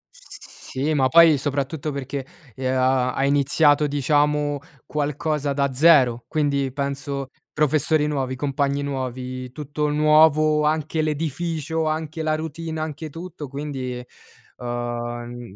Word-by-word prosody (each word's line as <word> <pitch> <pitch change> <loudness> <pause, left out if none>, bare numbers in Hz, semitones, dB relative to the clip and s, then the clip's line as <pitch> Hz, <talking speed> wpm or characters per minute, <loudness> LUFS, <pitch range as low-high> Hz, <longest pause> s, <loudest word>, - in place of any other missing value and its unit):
S - - -12
sì, 145 +4 0
ma 135 -3 +3
poi 165 +1 +7
soprattutto 145 +2 -2
perché 135 -1 -5 0.3
e 130 -1 -2
uhm, 130 - 0
ha 130 -1 +2
hai 135 +1 +1
iniziato, 145 +1 +3
diciamo, 145 +1 +1 0.3
qualcosa 150 -1 -1
da 140 -1 0
0. 130 -5 +5
Quindi 140 -4 0
penso 140 0 -4 0.2
professori 150 +1 +2
nuovi, 135 -3 -2
compagni 140 +1 -1
nuovi, 130 -2 -4
tutto 150 +1 -3
nuovo, 155 0 +4
anche 155 +1 0
l'edificio, 160 +1 -2
anche 155 0 -3
la 155 0 +1
routine, 160 +1 -5
anche 155 0 -5
tutto, 165 -1 -8
quindi, 130 -3 -5 0.5
uhm 120 -2 -5
145 Hz, 125 wpm, -23 LUFS, 130-155 Hz, 0.5 s, poi